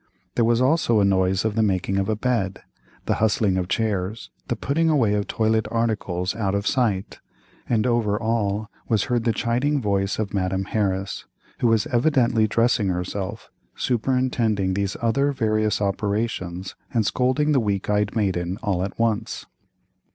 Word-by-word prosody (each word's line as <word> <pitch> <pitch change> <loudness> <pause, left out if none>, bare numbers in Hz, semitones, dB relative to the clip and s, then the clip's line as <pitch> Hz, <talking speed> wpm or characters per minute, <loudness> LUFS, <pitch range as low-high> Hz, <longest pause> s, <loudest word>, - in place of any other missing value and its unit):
There 120 - +2
was 120 +1 +3
also 130 -5 +3
a 100 - +4
noise 95 0 +2
of 110 - +1
the 110 - +1
making 95 -2 +1
of 95 +2 -1
a 110 - +1
bed, 110 -5 -1 0.4
the - - +1
hustling 105 -3 +2
of 90 -1 -1
chairs, 105 0 -2 0.2
the 120 - -1
putting 155 +8 0
away 125 -9 +3
of 105 -1 -1
toilet 110 0 +1
articles 105 -5 -1
out 100 -3 -1
of 100 0 -1
sight, 110 -8 0 0.5
and 115 -2 +2
over 115 -4 +1
all 110 -2 -1 0.2
was 110 -3 +2
heard 120 -2 -1
the 115 - +3
chiding 125 +7 0
voice 100 -4 0
of 105 -2 -3
Madame 95 -1 0
Harris, 95 -1 -2 0.3
who 120 - +2
was 115 -2 +3
evidently 120 -4 +2
dressing 115 -2 +2
herself, 95 +1 -4 0.2
superintending 120 -5 0
these 100 -1 -2
other 140 +5 +2
various 110 -4 0
operations, 100 -3 -2 0.2
and 115 -3 +1
scolding 130 +7 +1
the 140 - +4
weak 100 -4 -1
eyed 105 +1 0
maiden 95 -4 0
all 95 -4 0
at 95 0 -5
once. 115 -1 -1
110 Hz, 160 wpm, -23 LUFS, 100-115 Hz, 0.5 s, a